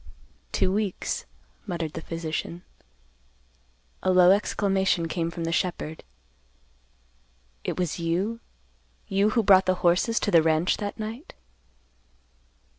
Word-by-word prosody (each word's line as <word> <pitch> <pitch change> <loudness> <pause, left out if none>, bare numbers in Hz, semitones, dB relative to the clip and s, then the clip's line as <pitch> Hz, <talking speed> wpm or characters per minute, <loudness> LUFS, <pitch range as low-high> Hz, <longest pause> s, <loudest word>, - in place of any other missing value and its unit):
"Two 185 - +1
weeks," 205 -1 -2 0.4
muttered 170 -4 -3
the 160 - -5
physician. 165 +1 -5 1.4
A - - 0
low 180 0 +7
exclamation 190 -3 +1
came 165 0 -2
from 170 0 -6
the 165 - -1
shepherd. 170 -3 -2 1.6
"It - - -3
was 180 -2 -2
you—you 170 - -3
who 225 +1 +1
brought 190 -1 +6
the 185 - +3
horses 180 +7 +3
to 205 - 0
the 170 -3 +6
ranch 160 +2 +2
that 205 -1 -4
night?" 225 - -7
180 Hz, 115 wpm, -26 LUFS, 165-200 Hz, 1.6 s, low